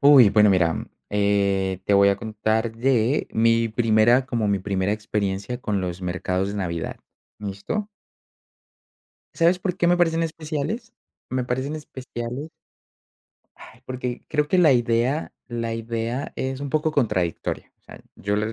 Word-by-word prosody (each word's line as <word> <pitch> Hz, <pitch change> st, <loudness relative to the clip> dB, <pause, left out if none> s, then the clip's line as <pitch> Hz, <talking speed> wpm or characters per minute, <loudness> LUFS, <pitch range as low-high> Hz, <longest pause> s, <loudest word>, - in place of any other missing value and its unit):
Uy, 140 Hz, -6 st, +8 dB
bueno, 105 Hz, 0 st, +5 dB
mira, 85 Hz, -4 st, +1 dB, 0.2 s
eh, 100 Hz, -2 st, +1 dB
te 100 Hz, -, +1 dB
voy 100 Hz, 0 st, +6 dB
a 100 Hz, -, +1 dB
contar 110 Hz, +1 st, -1 dB
de 125 Hz, +2 st, +2 dB
mi 115 Hz, 0 st, +3 dB
primera 115 Hz, +2 st, +3 dB
como 115 Hz, -4 st, -1 dB
mi 100 Hz, -1 st, +2 dB
primera 95 Hz, +1 st, 0 dB
experiencia 105 Hz, +1 st, -2 dB
con 105 Hz, -5 st, -1 dB
los 90 Hz, 0 st, -4 dB
mercados 90 Hz, +1 st, -1 dB
de 100 Hz, -, -4 dB
Navidad, 85 Hz, -5 st, -3 dB, 0.4 s
¿listo? 105 Hz, -, -4 dB, 1.5 s
¿Sabes 170 Hz, +2 st, +3 dB
por 180 Hz, -1 st, -2 dB
qué 175 Hz, -, +2 dB
me 175 Hz, -, +4 dB
parecen 165 Hz, -1 st, +2 dB
especiales? 155 Hz, -, -4 dB, 0.4 s
Me 130 Hz, -1 st, -1 dB
parecen 130 Hz, +5 st, -2 dB
especiales 130 Hz, 0 st, -6 dB, 1.1 s
Ay, -, -, -15 dB
porque 125 Hz, -1 st, -5 dB
creo 150 Hz, -1 st, 0 dB
que 185 Hz, -, +3 dB
la 155 Hz, -6 st, +6 dB
idea 120 Hz, +5 st, +1 dB, 0.2 s
la 115 Hz, -1 st, -3 dB
idea 115 Hz, +3 st, -3 dB
es 130 Hz, +1 st, -3 dB
un 140 Hz, -1 st, -4 dB
poco 155 Hz, 0 st, +1 dB
contradictoria. 105 Hz, -, -1 dB
O -, -, -52 dB
sea, -, -, -13 dB
yo 100 Hz, +2 st, -2 dB
lo 110 Hz, +1 st, -1 dB
115 Hz, 150 wpm, -24 LUFS, 100-135 Hz, 1.5 s, Uy